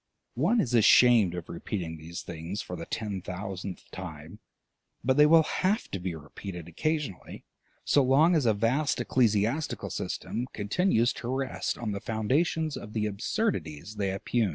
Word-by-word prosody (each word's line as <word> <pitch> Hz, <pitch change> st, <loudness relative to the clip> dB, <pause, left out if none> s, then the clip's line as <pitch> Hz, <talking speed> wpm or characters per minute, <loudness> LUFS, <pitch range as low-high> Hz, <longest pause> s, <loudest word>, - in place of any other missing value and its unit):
One 175 Hz, -, +2 dB
is 125 Hz, -, 0 dB
ashamed 115 Hz, -4 st, +6 dB
of 90 Hz, -2 st, -6 dB
repeating 85 Hz, -1 st, -4 dB
these 80 Hz, +2 st, -7 dB
things 85 Hz, +4 st, -5 dB
for 90 Hz, -, -6 dB
the 85 Hz, -, -7 dB
ten 105 Hz, -4 st, -3 dB
thousandth 95 Hz, 0 st, -6 dB
time, 85 Hz, +1 st, -8 dB, 0.6 s
but 130 Hz, +1 st, +2 dB
they 150 Hz, +1 st, +7 dB
will 160 Hz, +1 st, +7 dB
have 195 Hz, +7 st, 0 dB
to 95 Hz, -, -3 dB
be 90 Hz, -2 st, -3 dB
repeated 85 Hz, +3 st, -8 dB
occasionally, 150 Hz, -, -3 dB, 0.4 s
so 145 Hz, -, +4 dB
long 140 Hz, +7 st, +5 dB
as 145 Hz, -7 st, +2 dB
a 110 Hz, -, +4 dB
vast 125 Hz, +8 st, +1 dB
ecclesiastical 120 Hz, +3 st, +1 dB
system 120 Hz, +2 st, -3 dB
continues 115 Hz, -, +2 dB
to 120 Hz, -, -7 dB
rest 130 Hz, 0 st, -2 dB
on 115 Hz, -3 st, -3 dB
the 100 Hz, -1 st, -4 dB
foundations 140 Hz, +8 st, 0 dB
of 105 Hz, -, -9 dB
the 110 Hz, -2 st, 0 dB
absurdities 105 Hz, -, -2 dB
they 100 Hz, -1 st, 0 dB
oppugn. 100 Hz, +3 st, 0 dB
110 Hz, 155 wpm, -28 LUFS, 95-135 Hz, 0.6 s, they